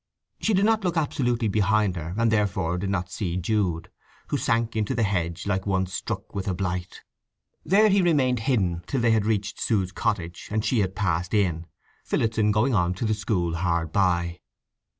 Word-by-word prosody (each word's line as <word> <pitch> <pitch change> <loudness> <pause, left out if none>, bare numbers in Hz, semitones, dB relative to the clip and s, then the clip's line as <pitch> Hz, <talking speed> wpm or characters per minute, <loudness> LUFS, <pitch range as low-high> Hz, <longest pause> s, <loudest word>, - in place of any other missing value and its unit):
She 220 - +1
did 195 +2 +3
not 220 -1 +2
look 175 -2 0
absolutely 125 -6 0
behind 105 -1 +2
her, 85 +1 -5
and 115 -1 +2
therefore 90 -5 0
did 95 +1 -2
not 90 -2 -2
see 90 -3 -3
Jude, 90 -3 -1 0.4
who - - 0
sank 115 0 0
into 110 +4 0
the 115 - +1
hedge 85 -4 -1
like 95 -1 -1
one 95 -1 +1
struck 90 - -5
with 100 0 -4
a 95 - 0
blight. 90 0 -4 0.6
There 200 +7 +5
he 200 -1 +4
remained 135 -8 +2
hidden 100 -9 0
till 135 - -1
they 115 -1 +3
had 110 -2 +2
reached 105 -1 -1
Sue's 95 -5 0
cottage 85 -4 -3
and 110 0 -1
she 125 - +2
had 95 -2 0
passed 90 -1 -1
in, 85 -5 0 0.4
Phillotson 110 -2 +1
going 115 +6 +2
on 90 -3 +2
to 105 - -3
the 110 - +2
school 90 -6 -1
hard 85 -2 0
by. 85 -2 +1
100 Hz, 190 wpm, -25 LUFS, 90-115 Hz, 0.6 s, There